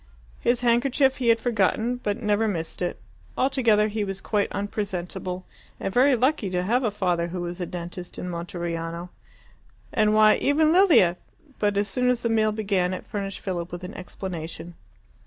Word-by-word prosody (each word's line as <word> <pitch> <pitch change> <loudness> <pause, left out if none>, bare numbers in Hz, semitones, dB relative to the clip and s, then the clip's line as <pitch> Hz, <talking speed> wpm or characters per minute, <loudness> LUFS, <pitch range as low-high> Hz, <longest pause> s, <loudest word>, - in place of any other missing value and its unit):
His 240 0 +1
handkerchief 260 +3 +3
he 250 - -2
had 230 0 +5
forgotten, 230 +1 +1
but 205 -4 -2
never 210 0 +1
missed 165 -5 -3
it. 175 - -2 0.4
Altogether, 235 -6 +3
he 215 0 -2
was 195 -1 -4
quite 205 +1 0
unpresentable, 185 -3 -4 0.3
and 195 - -3
very 260 +2 +5
lucky 250 -3 +1
to 180 -1 -1
have 240 +7 +1
a 225 - +2
father 180 -4 0
who 175 +1 -5
was 175 +1 -5
a 175 - -2
dentist 175 +1 -7
in - - -5
Monteriano. 170 0 -4 0.8
And 215 -1 +3
why, 215 0 +6
even 305 +2 +3
Lilia 325 - +5 0.4
But 205 -1 +1
as 205 0 +1
soon 250 +5 +1
as 250 -1 0
the 230 - +1
meal 220 -1 +3
began 195 -4 0
it - - -8
furnished 195 -2 -5
Philip 175 -2 -4
with 175 +1 -7
an 180 +4 -6
explanation. 175 -3 -7
205 Hz, 175 wpm, -25 LUFS, 180-230 Hz, 0.8 s, why